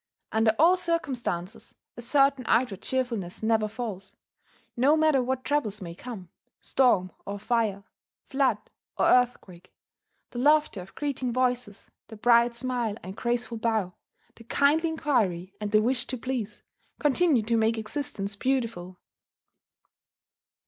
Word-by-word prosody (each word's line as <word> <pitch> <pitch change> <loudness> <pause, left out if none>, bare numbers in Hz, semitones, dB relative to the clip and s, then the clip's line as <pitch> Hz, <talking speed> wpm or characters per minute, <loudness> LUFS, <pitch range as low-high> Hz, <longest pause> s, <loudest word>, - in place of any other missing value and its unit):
Under 220 0 +2
all 345 +4 +5
circumstances 255 - -3 0.2
a 240 - -8
certain 275 +1 +3
outward 225 -6 +1
cheerfulness 230 -9 -3
never 220 -1 +2
falls: 210 -4 -6 0.6
no 275 +6 +4
matter 310 -4 +3
what 260 +1 -2
troubles 255 -7 -1
may 170 -4 -7
come, 195 -2 -9 0.3
storm 195 -9 +2
or 200 +1 -5
fire, 210 -2 -1 0.4
flood 270 -1 +1 0.4
or - - +2
earthquake, 205 -8 +1 0.6
the 240 - -5
laughter 295 -6 +3
of 180 - -14
greeting 270 -4 -2
voices, 250 -4 -1 0.2
the 220 - -11
bright 235 +1 +4
smile 240 -3 -2
and 190 +2 -8
graceful 235 0 -2
bow, 220 -5 0 0.4
the 230 - -13
kindly 300 +7 +2
inquiry 205 - 0
and 210 - -2
the 215 0 +4
wish 250 +2 0
to 255 - -4
please, 235 -4 -4 0.3
continue 295 -3 +2
to 230 +2 0
make 225 0 +2
existence 215 -4 -4
beautiful. 225 -7 -2
235 Hz, 130 wpm, -27 LUFS, 210-260 Hz, 0.6 s, all